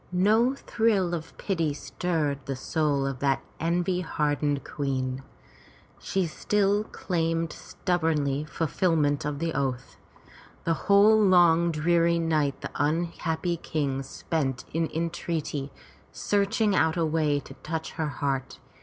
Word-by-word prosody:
No 215 +8 +3
thrill 215 -9 +1
of 165 -1 -5
pity 165 -7 -1
stirred 150 -3 -2
the 135 - -2
soul 145 0 0
of 135 -2 -3
that 140 -1 +1 0.2
envy 175 +3 0
hardened 145 -3 0
queen. 130 -2 -2 0.8
She 190 -2 -1
still 205 +5 +1
claimed 165 -4 -1
stubbornly 155 -5 -1
fulfilment 155 -2 0
of 150 -1 -2
the 165 +1 -2
oath. 130 -2 -3 0.7
The 165 - +2 0.2
whole 205 +2 +7
long 170 -3 +5
dreary 170 +2 +2
night 155 -4 0
the - - -5
unhappy 165 +2 -1
King 140 -4 -2
spent 135 -1 -3
in 165 0 0
entreaty, 160 -4 -3 0.4
searching 205 0 +1
out 160 -2 +3
the 170 -2 +1
way 155 -2 +1
to - - -12
touch 160 0 -4
her 160 - -2
heart. 135 -1 -2
160 Hz, 125 wpm, -27 LUFS, 145-175 Hz, 0.8 s, whole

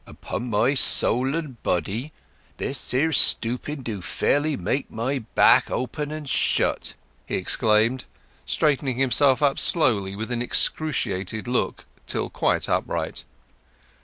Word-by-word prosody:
"Upon 120 0 -6
my 115 +5 +2
soul 130 0 +2
and 150 -8 -6
body, 105 - -2 0.5
this 135 - -2
here 155 +6 +1
stooping 130 +3 +2
do 110 -5 -5
fairly 145 - 0
make 105 +10 -2
my 130 +5 -2 0.2
back - - +5
open 145 +3 -3
and 155 -1 -6
shut!" - - 0 0.3
he - - -2
exclaimed, 110 +4 +1 0.4
straightening 140 -4 0
himself 135 +2 +3 0.2
slowly 100 - +3
with 110 +4 -5
an 120 -1 -2
excruciated 110 - -1
look 125 0 -2 0.2
till - - -2
quite - - 0
upright. - - -2
125 Hz, 120 wpm, -23 LUFS, 110-145 Hz, 0.5 s, back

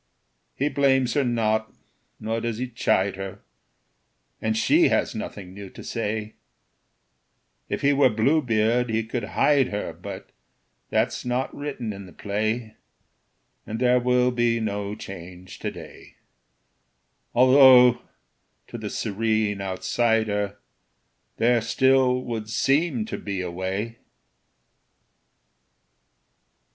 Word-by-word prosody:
He 140 - 0
blames 135 -3 +2
her 145 - +2
not, 110 -3 0 0.5
nor 115 +1 -2
does 115 -1 -3
he 130 +2 -3
chide 100 -5 0
her, 95 0 -7 1.0
And 110 0 0
she - - +4
has - - +1
nothing 95 -2 -7
new 100 0 -9
to - - -12
say; 110 -1 -3 1.4
If - - -3
he 140 +1 +4
were 140 -2 +5
Bluebeard 115 -1 +2
he 110 0 0
could 115 +1 -4
hide 140 -3 +4
her, 105 -2 -4
But - - -9 0.6
that's - - 0
not 125 +2 -2
written 135 -7 -4
in 100 -1 -9
the 90 - -14
play, 110 +2 -3 0.9
And 110 - -4
there 125 0 +4
will 125 0 +2
be 120 -1 +1
no 105 -2 -3
change 90 -2 -10
to 105 - -3
day; 85 -6 -12 1.2
Although, 130 -1 +7 0.7
to - - -7
the - - -5
serene 110 -1 -1
outsider, 105 +1 0 0.8
There 120 +1 +3
still 130 +2 +2
would 110 -3 -5
seem 135 0 +1
to - - -5
be 100 -2 -4
a 90 -1 -4
way. 95 +6 -4
115 Hz, 115 wpm, -24 LUFS, 105-125 Hz, 1.4 s, Although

